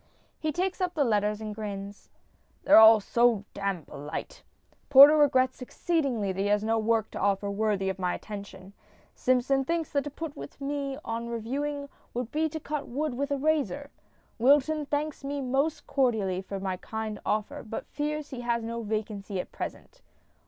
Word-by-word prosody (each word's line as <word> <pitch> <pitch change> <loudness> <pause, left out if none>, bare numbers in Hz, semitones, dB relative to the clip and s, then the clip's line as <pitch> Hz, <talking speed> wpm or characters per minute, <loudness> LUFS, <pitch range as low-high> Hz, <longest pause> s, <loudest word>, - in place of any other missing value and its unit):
%, - - -35 0.3
[He 310 -1 -1
takes 370 +4 -2
up 360 -1 -1
the 300 - +3
letter 210 -4 +2
s> 210 +1 -5
and 215 -1 -4
grins. 200 -1 -7 0.3
~] - - -39
They're - - +8
all 220 0 +9
so 230 0 +2
damned 195 -5 -3
polite. 150 - -7 0.5
Porter 285 +2 +10
regrets 260 -4 +3
exceedingly 255 - -1
that 190 - -6
he 200 - +1
has 205 0 +2
no 225 +1 +1
work 220 0 +1
to - - -6
offer 200 +1 +1
worthy 200 -2 0
of 190 0 -2
my 180 -1 0
attention; 200 -2 -9 0.4
Simpson 255 +2 +2
thinks 330 +2 -2
that 280 -1 +1
to 290 - -5
put 300 +1 -7 0.2
me 280 -1 -3
on 230 +1 -3
to - - -6
reviewing 280 +5 -3 0.3
would 245 -1 -3
be 315 +1 +1
to 315 +1 -5
cut 300 -1 -4
wood 290 +3 -2
with 280 +3 -2
a 285 - 0
razor; 290 -1 0 0.5
Wilton 290 +4 +3
thanks 295 0 -2
me 285 +1 -3
most 275 +4 -1
cordially 215 -9 +1
for 195 +1 -6
my 190 -1 -3
kind 220 +1 -5
offer, 210 0 -2
but 225 0 -6
fears 300 0 -4
he 250 -2 -5
has 235 -1 -1
no 230 +1 -4
vacancy 210 -2 -3
at - - -5
present. - - -7
240 Hz, 185 wpm, -28 LUFS, 210-285 Hz, 0.5 s, Porter